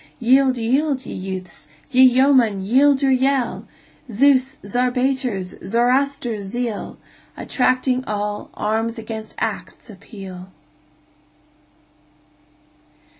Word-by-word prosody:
Yield, 260 +1 +3
yield, 265 +3 0
ye - - -7
youths! 185 -1 -7 0.2
ye 255 0 +4
yeomen, 255 -4 +4
yield 265 +8 +3
your 270 - +3
yell! 265 -1 0 0.4
Zeus', 265 +3 +2
Zarpater's, 250 -3 -1
Zoroaster's 245 +1 0
zeal, 230 +1 -4 0.4
Attracting 255 0 0
all, 210 0 -4
arms 225 +2 -2
against 220 -1 -7
acts 230 - -5
appeal! 190 -2 -11
245 Hz, 85 wpm, -20 LUFS, 210-265 Hz, 0.4 s, ye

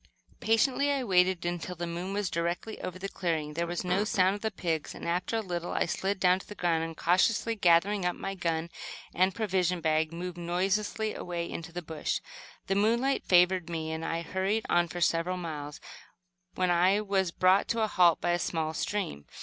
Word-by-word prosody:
Patiently 260 +6 +2
I 275 -2 0
waited, 185 -4 +2
until 175 +1 -3
the 175 0 -4
moon 175 +3 -4
was 200 -2 -1
directly 170 +6 -3
over 185 0 -5
the 195 +2 -4
clearing. 160 -6 -2
There 170 +2 -1
was 175 +2 -3
no 180 +3 +1
sound 190 -2 +2
of 205 - -6
the 220 - 0
pigs, 165 -6 -3
and, - - -7
after 180 +6 -1
a 225 - +1
little, 175 -3 -4
I - - +1
slid 195 +3 -2
to 180 0 +4
the 210 - -10
ground 170 -3 +1
and, 165 0 -6
cautiously 205 +6 +2
gathering 190 +1 +3
up 180 0 0
my 195 - -4
gun 170 -2 -2 0.4
and 185 +1 +2
provision 185 -5 0
bag, 155 -1 +1
moved 175 +1 -6
noiselessly 195 +5 -1
away 170 -1 -4
into 165 0 -7
the 175 +1 -5
bush. 160 -1 -2 0.5
The 195 - 0
moonlight 235 +7 +2
favored 180 -1 +4
me, 160 -1 -3
and 160 0 -4
I 165 +1 -2
hurried 190 +5 -1
on 175 0 +3
for 175 +1 -6
several 170 +2 +1
miles, 150 -4 -6 0.8
when 185 -1 +1
I 180 +4 +4
was 195 -3 0
brought 185 +3 +3
to 230 -1 0
a - - +2
halt 175 -5 +4
by 175 - 0
a 175 - +1
small 160 -2 -1
stream. 160 - -3
180 Hz, 200 wpm, -29 LUFS, 170-195 Hz, 0.8 s, to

